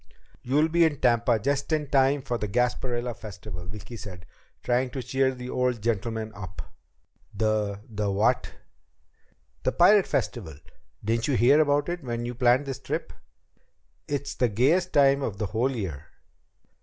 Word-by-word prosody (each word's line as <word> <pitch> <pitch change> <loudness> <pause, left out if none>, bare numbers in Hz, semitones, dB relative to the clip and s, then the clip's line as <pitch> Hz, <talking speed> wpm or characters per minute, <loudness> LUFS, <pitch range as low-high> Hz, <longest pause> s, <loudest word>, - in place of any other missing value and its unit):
"You'll 145 +5 +2
be 170 +1 +3
in 155 -4 +1
Tampa 120 -1 +3
just 140 +7 -1
in 155 -1 +1
time 135 0 +3
for 120 -3 -2
the 105 - -2
Gasparilla 125 +2 -1
Festival," 100 -4 -9
Vicki 105 +4 -8
said, 90 -5 -9 0.4
trying 125 +1 +1
to 130 -1 -5
cheer 130 +2 +1
the 125 0 -7
old 125 -2 0
gentleman 110 0 -2
up. 95 -3 -8 0.7
"The 105 -1 0
the 105 -2 -2
what?" 100 +2 +1 1.1
"The - - +1
Pirate 195 +3 +5
Festival. 85 - -2 0.5
Didn't 115 +1 0
you 140 - +1
hear 130 +7 +5
about 145 -1 +2
it 175 -2 -4
when 120 -2 -3
you 120 - -4
planned 125 +3 +3
this 135 -2 -5
trip? - - -4 0.9
It's 145 -1 -3
the 125 - +1
gayest 150 - +2
time 140 -1 +4
of 110 -7 -3
the 105 - -2
whole 115 +6 0
year." 95 - -5
120 Hz, 155 wpm, -26 LUFS, 105-135 Hz, 1.1 s, Pirate